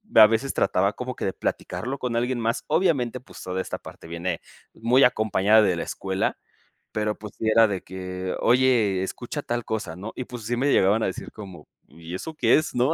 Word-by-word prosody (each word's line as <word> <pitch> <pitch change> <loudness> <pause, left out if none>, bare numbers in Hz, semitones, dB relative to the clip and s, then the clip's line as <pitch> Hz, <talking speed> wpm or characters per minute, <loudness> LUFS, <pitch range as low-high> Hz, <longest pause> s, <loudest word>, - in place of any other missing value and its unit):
a 110 -1 +10
veces 115 +5 0
trataba 100 +2 +2
como 125 +1 -5
que - - -4
de 95 - -1
platicarlo 130 +4 -3
con 125 -3 -3
alguien 125 +1 0
más, 115 0 -1
obviamente, 150 -8 +1
pues, - - -13
toda 95 0 -2
esta - - -5
parte - - -12
viene 85 0 -3 0.3
muy 125 +4 +3
acompañada 110 -2 +4
de 95 -5 +2
la - - -2
escuela, 95 0 -2 0.5
pero, 105 0 -2
pues, 105 -2 -9
sí 110 - -3
era 115 0 +6
de 95 -3 -3
que: 95 0 -5
"Oye, 120 -7 +3
escucha 120 +9 -5
tal 120 -2 -2
cosa", 110 -7 -3
¿no? 100 +6 -7
Y, 130 - -3
pues, 120 -2 -9
sí 120 +1 0
me 140 +3 +2
llegaban 100 +4 +4
a - - +2
decir - - -5
como: 95 -7 -11 0.2
"¿Y 85 +1 -10
eso 160 - -5
qué 120 -6 +4
es?", 155 - -1
¿no? 125 +4 +2
110 Hz, 210 wpm, -25 LUFS, 95-125 Hz, 0.5 s, a